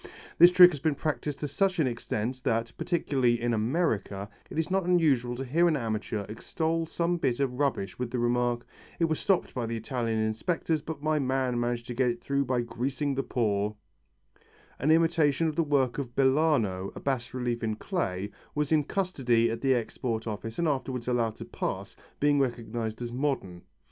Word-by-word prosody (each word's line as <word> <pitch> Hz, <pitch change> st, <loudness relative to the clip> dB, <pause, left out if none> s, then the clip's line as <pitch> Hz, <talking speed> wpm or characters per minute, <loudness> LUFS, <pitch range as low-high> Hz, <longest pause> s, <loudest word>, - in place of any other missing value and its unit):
This 175 Hz, +2 st, +9 dB
trick 180 Hz, 0 st, +9 dB
has 145 Hz, -, -5 dB
been 150 Hz, +1 st, +1 dB
practised 145 Hz, -1 st, -3 dB
to 150 Hz, -, -1 dB
such 185 Hz, +6 st, +1 dB
an 160 Hz, -, +3 dB
extent 120 Hz, 0 st, -3 dB
that, 115 Hz, -1 st, 0 dB
particularly 130 Hz, -9 st, +1 dB
in 120 Hz, 0 st, 0 dB
America, 110 Hz, -, -1 dB, 0.2 s
it -, -, -7 dB
is 160 Hz, +2 st, -1 dB
not 190 Hz, 0 st, +2 dB
unusual 145 Hz, -9 st, +2 dB
to 135 Hz, +2 st, -4 dB
hear 165 Hz, +7 st, +3 dB
an 160 Hz, -3 st, +2 dB
amateur 110 Hz, -3 st, -3 dB
extol 160 Hz, +9 st, -2 dB
some 170 Hz, +2 st, 0 dB
bit 125 Hz, -7 st, 0 dB
of 130 Hz, -2 st, -1 dB
rubbish 125 Hz, -10 st, -1 dB
with 125 Hz, -1 st, -2 dB
the 125 Hz, -, -3 dB
remark, 120 Hz, 0 st, +1 dB, 0.3 s
"It 165 Hz, -, +2 dB
was 160 Hz, -1 st, -1 dB
stopped 195 Hz, -3 st, +1 dB
by 120 Hz, -3 st, -2 dB
the 115 Hz, 0 st, -2 dB
Italian 115 Hz, -1 st, -2 dB
inspectors, 145 Hz, +9 st, 0 dB
but 155 Hz, -1 st, -7 dB
my 155 Hz, 0 st, +2 dB
man 130 Hz, -2 st, 0 dB
managed 120 Hz, 0 st, -1 dB
to 125 Hz, -, -5 dB
get 125 Hz, +1 st, +2 dB
it 120 Hz, 0 st, -3 dB
through 140 Hz, +1 st, 0 dB
by 125 Hz, -1 st, +1 dB
greasing 130 Hz, +5 st, -2 dB
the 135 Hz, -, 0 dB
paw 105 Hz, -5 st, 0 dB, 0.5 s
" -, -, -31 dB
An 140 Hz, -, +1 dB
imitation 160 Hz, -2 st, +3 dB
of 155 Hz, -, -2 dB
the 170 Hz, -, +2 dB
work 140 Hz, -4 st, +1 dB
of 125 Hz, -4 st, -5 dB
Bellano, 130 Hz, -9 st, +2 dB
a -, -, -6 dB
bas 130 Hz, -3 st, -2 dB
relief 120 Hz, -2 st, -2 dB
in 110 Hz, -1 st, 0 dB
clay, 100 Hz, -, -3 dB, 0.2 s
was 150 Hz, 0 st, -1 dB
in 150 Hz, -2 st, +3 dB
custody 125 Hz, -12 st, +1 dB
at 115 Hz, -, -4 dB
the 135 Hz, -1 st, +3 dB
Export 115 Hz, -1 st, -2 dB
Office 110 Hz, +1 st, -5 dB
and 170 Hz, -, +1 dB
afterwards 130 Hz, -4 st, -2 dB
allowed 120 Hz, -3 st, +1 dB
to -, -, -8 dB
pass, -, -, -4 dB, 0.2 s
being 145 Hz, 0 st, +3 dB
recognized 120 Hz, -3 st, -2 dB
as 120 Hz, -, -4 dB
modern. 125 Hz, -10 st, -2 dB
130 Hz, 195 wpm, -28 LUFS, 115-150 Hz, 0.5 s, This